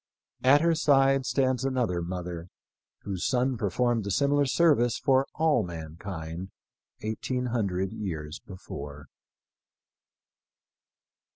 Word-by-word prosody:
At 140 +3 +6
her 170 0 +3
side 135 -4 +3
stands 130 -1 +1
another 125 -10 0
Mother 85 -1 -5 0.6
whose 95 -3 -4
son 130 +1 +1
performed 115 +1 0
a - - -1
similar 140 +6 +2
ser 165 +4 +5
vice 120 -3 +1
for 135 0 +2
all 155 -5 +3
mankind 85 0 -6 0.5
eighteen 125 +4 -2
hundred 95 -4 -1
years 80 -8 -5
before. 75 -6 -9
110 Hz, 105 wpm, -28 LUFS, 90-135 Hz, 0.6 s, At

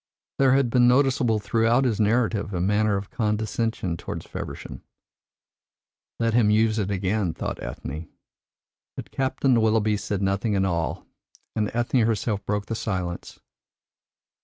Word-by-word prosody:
There 135 -1 +5
had 135 -3 +2
been 120 0 +5
noticeable 125 -3 +3
throughout 115 +5 +2
his 115 -4 0
narrative 105 -2 +1
a - - -1
manner 105 +2 +2
of 100 0 -7
condescension 110 -4 -1
towards - - -6
Feversham. - - -7 1.4
"Let 115 -1 +1
him 115 -3 +4
use 110 +1 +3
it 100 -2 -1
again!" 95 -2 -1
thought - - -4
Ethne. 75 +5 -6 0.9
But - - -8
Captain 130 -2 +1
Willoughby 110 -1 +2
said 100 -1 -3
nothing 100 +2 0
at 95 0 +2
all, 85 -3 -2 0.5
and 105 -1 0
Ethne 120 +2 +1
herself 110 -2 0
broke 105 0 -1
the 115 - -4
silence. 90 -5 -4
110 Hz, 135 wpm, -25 LUFS, 100-115 Hz, 1.4 s, There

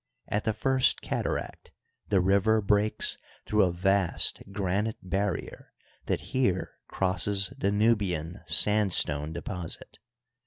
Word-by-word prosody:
At 105 - -1
the 110 - +1
First 130 +4 +2
Cataract - - -3 0.4
the 100 -2 +3
river 100 +4 +3
breaks 105 +1 +1 0.3
through 105 0 +2
a 90 - 0
vast 95 +1 +1
granite 100 +3 -1
bar 95 +1 0
rier - - -9 0.3
that - - 0
here 110 -9 0
crosses 95 +4 -1
the 135 -7 0
Nubian 100 -6 0
sandstone 85 -5 +2
deposit. 85 0 -7
100 Hz, 115 wpm, -28 LUFS, 90-105 Hz, 0.4 s, the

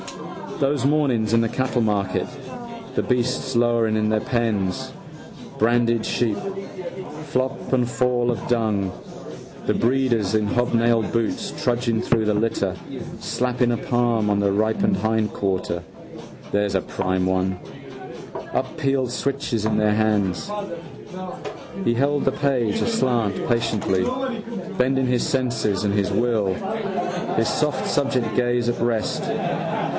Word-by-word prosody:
Those 135 -1 +1
mornings 130 -7 +2
in 115 - +5
the 115 - +1
cattlemarket, 110 -7 0 0.7
the - - +2
beasts 125 +1 0
lowing 120 -2 +3
in 110 0 +1
their 110 0 +3
pens, 110 -7 -1 0.6
branded 115 0 +3
sheep, 110 -4 +1 0.9
flop 130 0 -1
and 125 -2 +2
fall 125 -1 +1
of 115 - -4
dung, 110 -5 +1 0.7
the - - +2
breeders 120 -5 +2
in 105 -1 +2
hobnailed 115 0 +2
boots 115 -2 -1
trudging 120 -2 +1
through 115 -2 +2
the 105 - +2
litter, 110 +2 0 0.4
slapping 125 0 0
a 120 - +1
palm 120 -2 +1
on 100 0 +2
a - - +4
ripemeated 110 - +2
hindquarter, 100 -5 0 0.7
there's 100 -1 +1
a 95 - +3
prime 95 0 -1
one, 95 0 0 0.9
unpeeled 135 -2 0
switches 135 -5 -1
in 110 -1 +2
their 105 -1 +3
hands. 105 - +1 1.3
He 120 - +3
held 140 +4 +1
the 135 - +2
page 125 -7 +1
aslant 120 - +1
patiently, 115 -5 +1 0.7
bending 130 +1 +2
his 125 -1 +1
senses 115 -7 0
and 100 - +2
his 100 -2 +1
will, 110 -5 +2 0.8
his 115 - +2
soft 150 -3 0
subject 130 -6 +1
gaze 120 -1 +2
at 120 - -1
rest. 115 -2 0
115 Hz, 120 wpm, -23 LUFS, 105-125 Hz, 1.3 s, in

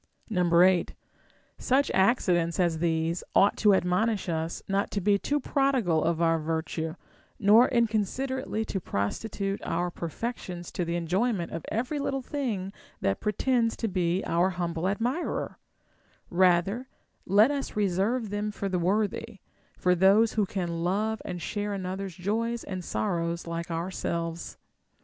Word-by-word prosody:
8. 180 -1 +4 0.6
Such 275 +2 +2
accidents 185 -4 +2
as 170 -3 +2
these 165 0 0
ought 200 - +5
to 210 -2 +5
admonish 190 +3 +1
us 165 0 -2
not 200 +1 0
to 205 - -2
be 200 +1 +2
too 290 +7 0
prodigal 255 - +1
of 165 0 0
our 165 0 +3
virtue, 160 0 -3 0.4
nor 220 +4 +6
inconsiderately 235 +1 0
to 195 - -3
prosti 100 - -2
tute 195 -1 -3
our 175 +1 -1
perfections 175 0 -5
to 180 - -2
the 170 0 -2
enjoyment 180 +3 0
of 165 - -5
every 250 +7 -1
little 270 -1 -2
thing 220 -10 -3 0.3
that 100 - 0
pretends 230 +2 +1
to 225 - -1
be 180 -1 0
our 175 +3 +2
humble 175 -1 -2
admirer; 240 - -2 0.7
rather 185 +7 +3 0.4
let 210 +7 +5
us 280 -1 -3
re 210 -1 +2
serve 205 +5 0
them 205 +1 -1
for 205 -1 -4
the 185 -2 0
worthy, 205 +4 -1 0.4
for 180 - +3
those 195 +5 +4
who 210 -3 +1
can 170 -4 -3
love 215 +5 0
and 180 -2 -5
share 205 -1 -2
another's 190 -1 -4
joys 225 +6 -1
and 185 -2 -5
sorrows 170 -3 -2
like 170 0 -4
ourselves. 170 -1 -3
190 Hz, 145 wpm, -28 LUFS, 170-220 Hz, 0.7 s, nor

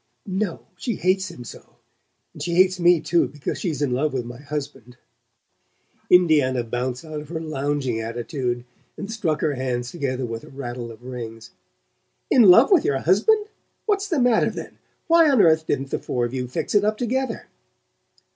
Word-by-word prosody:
"No: 190 -3 -2 0.2
she 235 -5 -3
hates 185 +1 0
him 145 -8 -10
so. - - -13 0.6
And - - -11
she 170 -1 -2
hates 185 0 +4
me 175 -2 +5
too, 170 - +2
because 145 -2 -5
she's 155 -6 -2
in 140 - 0
love 140 +4 0
with 125 -3 -2
my 120 +1 -9
husband." 140 -4 -7 1.1
Indiana 150 -8 +4
bounced 125 +4 -3
out 155 -1 -6
of 150 - -13
her 165 -1 -4
lounging 145 -5 -2
attitude 120 +2 -3 0.3
and 200 - -6
struck 165 -9 -1
her 155 -2 +1
hands 125 -2 -3
together 135 -6 -2
with 115 -1 -6
a - - -13
rattle 120 -3 -6
of 115 +2 -14
rings. 115 -3 -8 0.8
"In 255 - +6
love 225 - +7
with 365 -6 +5
your 140 - +1
husband? 230 - +2 0.4
What's 410 -1 0
the 340 -6 -1
matter, 245 -2 +3
then? - - -8 0.3
Why 335 -2 +5
on 270 -4 +3
earth 160 -4 +4
didn't 135 -1 -2
the - - -1
four 120 -1 -2
of 120 - -5
you 125 -1 -3
fix 125 - -3
it 205 -1 +4
up 215 +1 +1
together?" 250 0 -2
150 Hz, 180 wpm, -23 LUFS, 125-190 Hz, 1.1 s, love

